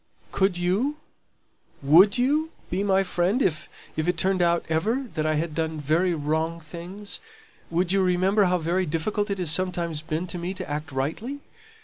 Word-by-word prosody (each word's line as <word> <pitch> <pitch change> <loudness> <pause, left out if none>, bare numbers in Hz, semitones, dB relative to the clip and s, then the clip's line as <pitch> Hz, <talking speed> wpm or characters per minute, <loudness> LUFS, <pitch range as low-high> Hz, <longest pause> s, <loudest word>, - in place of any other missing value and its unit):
"Could 190 -2 +1
you? 200 +12 0 0.9
Would 180 - +6
you 295 +6 +2 0.2
be 185 +3 0
my 195 -1 +3
friend 180 +5 +1
if 165 - 0 0.3
if 155 +1 -1
it 180 -1 +1
turned 185 +1 +1
out 170 0 +2
ever 215 +12 0
that 155 0 -1
I 155 - +1
had 155 +1 -1
done 160 0 -2
very 165 +5 +1
wrong 160 +2 -1
things? 175 +6 -7 0.5
Would 175 +2 0
you 195 0 +3
remember 190 +3 +3
how 180 0 +2
very 175 +2 0
difficult 205 +7 -1
it 200 - -1
has 175 -5 +1
sometimes 170 -3 0
been 155 +2 -3
to 175 - -4
me 180 +3 -4
to 185 -1 -6
act 150 +1 -4
rightly?" 165 - -3
175 Hz, 175 wpm, -25 LUFS, 160-195 Hz, 0.9 s, Would